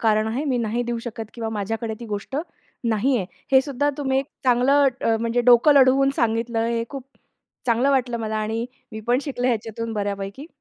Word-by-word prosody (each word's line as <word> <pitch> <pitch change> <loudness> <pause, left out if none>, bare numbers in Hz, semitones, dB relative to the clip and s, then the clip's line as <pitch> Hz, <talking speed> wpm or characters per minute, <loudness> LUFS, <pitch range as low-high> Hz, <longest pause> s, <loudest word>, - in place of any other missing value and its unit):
कारण 215 -1 +2
आहे 255 +7 -2
मी 260 -4 0
नाही 235 +1 -1
देऊ 235 - -1
शकत 225 -2 -6
किंवा 225 -2 -4
माझ्याकडे 220 +1 -3
ती - - -6
गोष्ट 210 +5 -4 0.5
नाही 235 +4 +2
आहे. 190 - -2 0.3
हे 265 - +8
सुद्धा 285 +1 0
तुम्ही 265 -2 +1
एक 270 - -2 0.2
चांगलं 265 +3 +4
अ, 225 -1 +2
म्हणजे 230 +1 +1
डोकं 245 +5 +7
लढवून 270 0 +5
सांगितलं 230 0 0
हे 230 0 -1
खूप 275 -3 -7 0.6
चांगलं 240 +4 +3
वाटलं 250 -3 +1
मला 220 -1 -3
आणि 220 +2 -2 0.3
मी 220 - -6
पण 245 +1 +3
शिकले 255 -4 -2
ह्याच्यातून 230 -1 -2
बऱ्यापैकी. 200 +5 -4
235 Hz, 185 wpm, -23 LUFS, 220-265 Hz, 0.6 s, हे